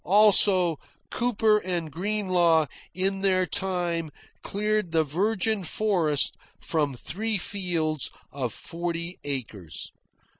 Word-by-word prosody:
Also, 190 -4 +6 0.3
Cooper 220 -3 +2
and 175 -5 -3
Greenlaw 180 -3 +2 0.3
in 195 +1 0
their 185 -2 +2
time 175 -4 -1 0.3
cleared 210 -2 -1
the 160 -1 +3
virgin 200 +6 0
forest 170 -6 +1 0.2
from 150 -5 -1
three 210 - -3
fields 175 -6 -1 0.2
of 130 -4 -3
forty 170 +3 -5
acres. 115 - -6
180 Hz, 100 wpm, -26 LUFS, 160-200 Hz, 0.3 s, Also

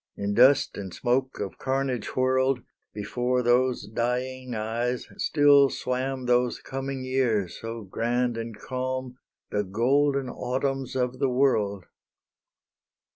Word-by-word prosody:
In 100 0 -1
dust 130 +5 +5
and 95 -2 -6
smoke 130 +6 -1
of 100 -4 -5
carnage 130 -5 -2
whirled, 130 0 +2 0.3
Before 125 +4 -1
those 125 -1 +2
dying 125 +3 -2
eyes 115 +3 -2
still 145 -2 +5
swam 130 +1 -2
Those 125 0 +2
coming 135 0 -5
years 125 -8 0
so 115 0 -5
grand 120 +4 -1
and 115 -1 -5
calm, 130 0 -4 0.3
The 105 - 0
golden 135 +7 +1
Autumns 130 +2 -2
of 125 0 -1
the 135 - +2
world! 110 -7 +1
125 Hz, 120 wpm, -26 LUFS, 115-130 Hz, 0.3 s, dust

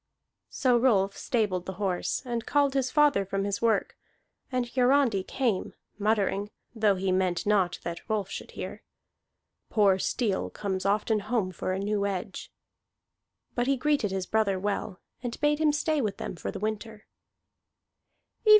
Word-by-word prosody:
So 250 -3 +2
Rolf 200 -6 +3
stabled 205 -7 -1
the 190 - -3
horse, 190 +1 -1
and 235 -2 -3
called 285 -2 +3
his 265 -2 +1
father 295 -8 +4
from 195 +1 -2
his 200 0 -2
work; 230 -1 +1 0.6
and 250 -1 0
Hiarandi 250 -4 +3
came, 225 -1 -1 0.2
muttering 205 -1 +1 0.2
(though 215 -3 +3
he 190 0 0
meant 185 -2 +1
not 200 -4 +2
that 170 +6 -6
Rolf 210 -3 0
should - - -7
hear), - - -6 0.9
"Poor 200 -3 +4
steel 210 -1 0
comes 195 -2 -3
often 215 +2 +2
home 210 -2 -1
for 185 - -3
a 185 - -1
new 200 +1 0
edge." 195 0 -5 1.0
But 245 0 0
he 275 0 +3
greeted 290 -5 +1
his 190 -1 -2
brother 210 -1 +1
well, 200 -1 -2 0.2
and 245 -2 -5
bade 295 0 +2
him 310 -1 +4
stay 300 0 +1
with 210 -4 -2
them - - -5
for - - -5
the - - -5
winter. 215 +1 -4
210 Hz, 155 wpm, -28 LUFS, 195-245 Hz, 1.0 s, father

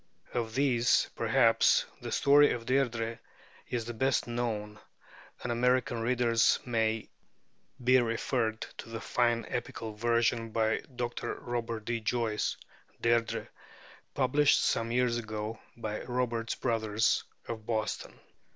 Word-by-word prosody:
Of 115 -2 -2
these 125 -4 +3
perhaps - - +4 0.2
the - - -5
story 145 +1 +5
of 115 -1 -5
'Deirdrê' 120 -3 0 0.5
is 120 -2 -2
the 120 - -5
best 130 +3 +1
known, 110 -3 -3 0.6
and 120 - -2
American 120 0 +1
readers 120 -1 +3
may 110 -2 0 0.8
be 125 +1 +5
referred 115 -1 -1 0.2
to - - -8
the 115 0 -5
fine 120 0 +1
epical 115 -2 -4
version 115 +1 +1
by 110 0 +1
Dr. 120 0 -3
Robert 115 -2 -4
D. 115 0 -1
Joyce 115 -1 -1 0.4
('Deirdrê'), 115 -1 +1 0.7
published 140 +2 +3
some 115 0 +1
years 125 -1 +2
ago 110 -1 -5 0.2
by 110 -2 -4
Roberts 120 -2 -1
Brothers 110 -1 +1 0.2
of 110 -2 -6
Boston. 110 -2 -3
115 Hz, 120 wpm, -30 LUFS, 110-120 Hz, 0.8 s, story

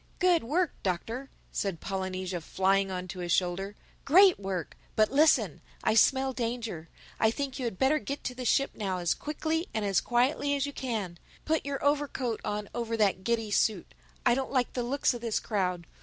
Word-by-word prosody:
"Good 360 -5 +3
work, 325 +8 +1
Doctor!" 225 +9 -3 0.2
said 195 -5 -2
Polynesia, 185 -2 -3
flying 195 +3 +1
on 185 -1 -4
to 180 +2 -6
his 175 -1 -3
shoulder—"Great 205 - +3
work!—But 195 +3 -2
listen: 305 +3 +3 0.2
I - - +3
smell 265 +4 +4
danger. 230 -9 -4 0.3
I 220 - +4
think 275 +3 -3
you 255 - -2
had 225 -6 -3
better 275 +6 +3
get 280 0 -5
back - - -32
to 250 - -3
the 250 0 -6
ship 275 +3 +2
now 195 -4 -2
as 175 -2 +1
quick 300 0 -7
and 315 - 0
as 195 -2 +2
quietly 270 +4 +1
as 280 -1 0
you 285 - -5
can. 210 -11 -3 0.3
Put 315 -2 0
your 280 0 -3
overcoat 280 -5 0
on 210 0 -3
over 230 -1 -2
that 195 -3 +2
giddy 225 -1 0
suit. 205 -2 +1 0.3
I - - +6
don't 265 +1 -2
like 255 -3 +1
the 250 - -1
looks 260 +3 +1
of 240 - -6
this 230 -2 0
crowd. 180 -5 -1
230 Hz, 185 wpm, -29 LUFS, 190-275 Hz, 0.3 s, I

